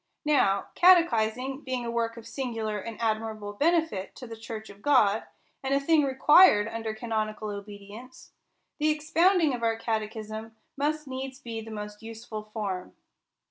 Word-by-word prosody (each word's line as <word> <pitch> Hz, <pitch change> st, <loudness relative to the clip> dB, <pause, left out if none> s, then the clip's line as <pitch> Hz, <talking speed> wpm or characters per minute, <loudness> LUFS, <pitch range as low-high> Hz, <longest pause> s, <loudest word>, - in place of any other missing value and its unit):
Now 200 Hz, -10 st, +2 dB
catechising 265 Hz, -7 st, +3 dB
being 255 Hz, -2 st, -3 dB
a 235 Hz, -, -3 dB
work 230 Hz, 0 st, -1 dB
of 230 Hz, -, -10 dB
singular 225 Hz, -5 st, -3 dB
and 225 Hz, +2 st, -7 dB
admirable 220 Hz, -2 st, -2 dB
benefit 310 Hz, -, 0 dB
to 255 Hz, -, -9 dB
the 230 Hz, -1 st, -8 dB
church 220 Hz, -1 st, -8 dB
of 200 Hz, 0 st, -17 dB
God, 220 Hz, -6 st, +3 dB, 0.4 s
and 270 Hz, +1 st, 0 dB
a -, -, +3 dB
thing 310 Hz, +2 st, +3 dB
required 265 Hz, -, +6 dB
under 225 Hz, -1 st, -4 dB
canonical 215 Hz, -2 st, -3 dB
obedience, 205 Hz, +4 st, -10 dB, 0.5 s
the 305 Hz, +1 st, +2 dB
expounding 315 Hz, +1 st, +3 dB
of 245 Hz, -, -4 dB
our 225 Hz, -1 st, +1 dB
catechism 220 Hz, 0 st, -4 dB, 0.2 s
must 300 Hz, +2 st, -1 dB
needs 260 Hz, 0 st, -5 dB
be 230 Hz, -4 st, -6 dB
the 220 Hz, -, -10 dB
most 210 Hz, -1 st, -7 dB
useful 225 Hz, -1 st, -7 dB
form. 205 Hz, -4 st, -5 dB
225 Hz, 150 wpm, -28 LUFS, 215-270 Hz, 0.5 s, required